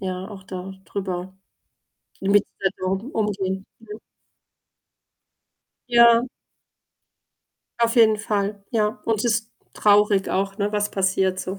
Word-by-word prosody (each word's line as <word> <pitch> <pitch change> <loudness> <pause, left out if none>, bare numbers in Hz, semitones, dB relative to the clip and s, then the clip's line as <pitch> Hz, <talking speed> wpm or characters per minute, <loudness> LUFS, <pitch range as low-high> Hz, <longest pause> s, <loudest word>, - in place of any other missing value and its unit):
ja, 185 0 -4
auch 195 -3 -10
da 185 0 -7
drüber 185 -1 -5 0.9
mit 200 +1 +3 0.2
der 190 - +2
Situation 195 +8 -3
umgehen, 195 -3 -2
ne? 215 -1 -10 1.9
Ja 235 0 +6 1.5
Auf 235 +1 +1
jeden 220 -2 +6
Fall, 205 -1 -2
ja. 215 -2 0
Und 225 0 0
ist 230 -1 0 0.2
traurig 205 -1 +3
auch, 195 +1 -1
ne, 205 +1 0
was 210 0 0
passiert 190 -1 +1
so. 190 +2 -5
205 Hz, 115 wpm, -23 LUFS, 190-220 Hz, 1.9 s, Ja